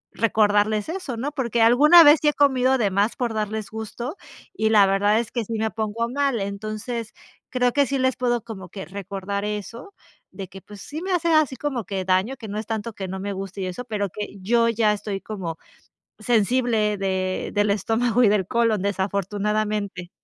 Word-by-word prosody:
recordarles 210 0 +2
eso, 330 -9 -4
¿no?, 270 +6 -3
porque 235 -5 0
alguna 300 +9 +8
vez 295 0 +7
sí 300 - +1
he 295 - +4
comido 265 -2 +3
de 210 -5 +1
más 200 +4 +1
por 240 -3 -2
darles 215 -1 -3
gusto, 220 - -6 0.4
y 220 -11 0
la 210 -2 +6
verdad, 205 +2 +2
es 235 -1 -4
que 235 - -2
sí 230 - -6
me 220 0 -1
pongo 220 +1 -2
mal, 275 -1 0
entonces, 215 +3 -5 0.4
creo 250 -1 +1
que 285 -1 +3
sí 275 - -1
les 260 -1 +1
puedo 240 -3 0
como 200 -6 -9
que 190 +2 -8
recordar 200 +1 -5
eso 210 - -6 0.3
de 195 -2 -8
que, 195 0 -11
pues 205 -2 -13
sí, 310 +2 -7
me 375 +1 -2
hace 340 -1 +1
así 310 -4 +3
como 260 -6 -3
que 190 0 -3
daño, 190 +7 +1
que 225 - -9
no 210 +1 -4
es 215 - -7
tanto 225 0 -3
que 195 -2 -6
no 190 +1 -5
me 200 +1 -3
guste 195 0 -6
y - - -2
eso, 185 +7 -5
pero 210 -4 -2
que 205 +2 -7
yo 230 +4 +3
ya 220 -2 +2
estoy 205 -1 -4
como 185 -6 -6 0.6
sensible 220 -1 +1
de 190 -1 -2
del 205 0 +2
estómago 225 +4 +1
y - - +6
del 200 -2 +2
colon, 230 -1 +1
desafortunadamente. 200 0 -2
215 Hz, 200 wpm, -23 LUFS, 200-245 Hz, 0.6 s, alguna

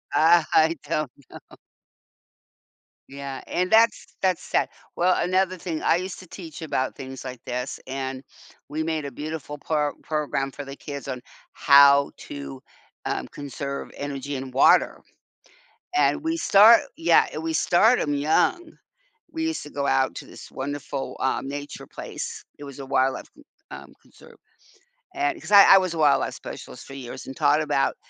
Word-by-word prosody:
Uh, 165 +1 +5
I 160 +1 +4
don't 155 -3 -2 0.2
know. - - -14 1.5
Yeah, 140 -1 -7
and 180 +1 -1
that's 225 +1 +4 0.2
that's 185 -2 +1
sad. - - 0 0.3
Well, 180 +1 +3
another 185 +1 +1
thing, 165 -3 -4
I 165 - +3
used 185 +1 -4
to 185 - -13
teach 165 -4 -10
about 130 -4 -2
things 130 0 -8
like 130 -2 -8
this, 125 +2 -4
and 130 0 -4 0.5
we 155 +2 -2
made 160 -2 -2
a 140 - -5
beautiful 150 +1 -6
pro 150 0 -1
program 145 -3 -2
for 145 0 -8
the 135 - -8
kids 140 -1 -8
on 130 -2 -5 0.3
how 140 0 +6
to, 70 -2 -8 0.4
um, - - -2
conserve 140 -1 -6
energy 140 0 -5
and 130 -1 -6
water, 135 - +4 1.0
and 310 -4 +2
we 325 +1 -1
start, 225 +1 +7 0.2
yeah, 330 +1 +4
eh, - - -5
we 325 0 -3
start 225 - +4
'em 145 - -1
young. 160 - +1 0.5
We 320 0 -3
used 325 0 -2
to 145 - -10
go 140 -1 -2
out 135 -7 +1
to - - -8
this - - -12
wonderful, 140 0 -5
um, 135 0 -1
nature 145 +1 -7
place. - - -7 0.2
It 145 - -9
was 140 0 -10
a 135 - -7
wildlife 135 0 0
c 300 - -17 0.3
um, - - -10
conserve, - - -19 0.8
and 350 -1 -1
'cause - - -9
I 200 -1 +10
I - - +9
was 185 -3 0
a - - -5
wildlife 150 -3 +3
specialist - - -9
for 135 - -11
years 130 -3 -8
and 135 - -8
taught 145 +2 +3
about 145 -2 0
145 Hz, 165 wpm, -24 LUFS, 135-180 Hz, 1.5 s, I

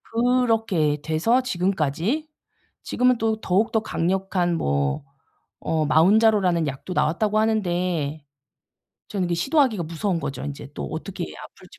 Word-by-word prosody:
그렇게 225 -10 +1
돼서 175 +11 +2
지금까지 190 - -1 0.6
지금은 250 0 +2
또 220 -1 0
더욱더 220 +4 +1
강력한 180 -1 0
뭐 70 - 0 0.6
어 160 -1 0
마운자로라는 180 +2 +4
약도 140 +6 -5
나왔다고 210 +7 +1
하는데 175 -8 -1 0.8
저는 195 -3 -2
이게 175 - 0
시도하기가 245 - +2
무서운 170 +2 -2
거죠, 140 - -5
인제 140 -1 -7
또 - - -5
어떻게 170 +4 -5
아플지 - - -14
185 Hz, 300 characters per minute, -23 LUFS, 160-220 Hz, 0.8 s, 마운자로라는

